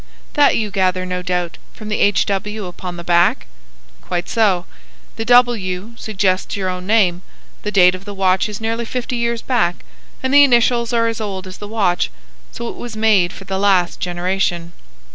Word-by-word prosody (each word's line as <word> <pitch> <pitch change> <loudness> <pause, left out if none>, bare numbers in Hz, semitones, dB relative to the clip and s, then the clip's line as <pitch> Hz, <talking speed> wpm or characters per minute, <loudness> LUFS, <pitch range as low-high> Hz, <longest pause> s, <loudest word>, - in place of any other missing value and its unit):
"That 290 -1 +4
you 215 -2 -2
gather, 185 -2 0
no 180 0 -3
doubt, 180 -1 -3 0.2
from 215 -1 -8
the 210 - -1
H. 205 -1 +3
W. 210 +1 -3
upon 180 0 -7
the 170 - -7
back?" 175 0 +2 0.6
"Quite 175 0 -3
so. 200 -6 +1 0.5
The 225 - -4
W. 225 -5 +2
suggests 195 -4 -1
your 190 -2 -1
own 180 0 -5
name. 190 -5 +3 0.4
The 210 - -3
date 180 -3 +5
of 185 +1 -8
the 205 - -6
watch 190 +1 +2
is 210 - -6
nearly 225 +1 -2
fifty 250 +1 -3
years 235 -1 -1
back, 220 -9 0 0.4
and 260 +1 0
the 285 0 +9
initials 240 -2 +3
are 230 -1 +2
as 230 -1 -3
old 195 -3 -4
as 185 0 -10
the 205 - -7
watch: 200 - 0 0.4
so 235 - -6
it - - -7
was 235 -2 -7
made 210 -5 +3
for 195 - -11
the 190 0 -3
last 190 -3 +2
generation. 175 -1 -2
200 Hz, 185 wpm, -18 LUFS, 180-225 Hz, 0.6 s, the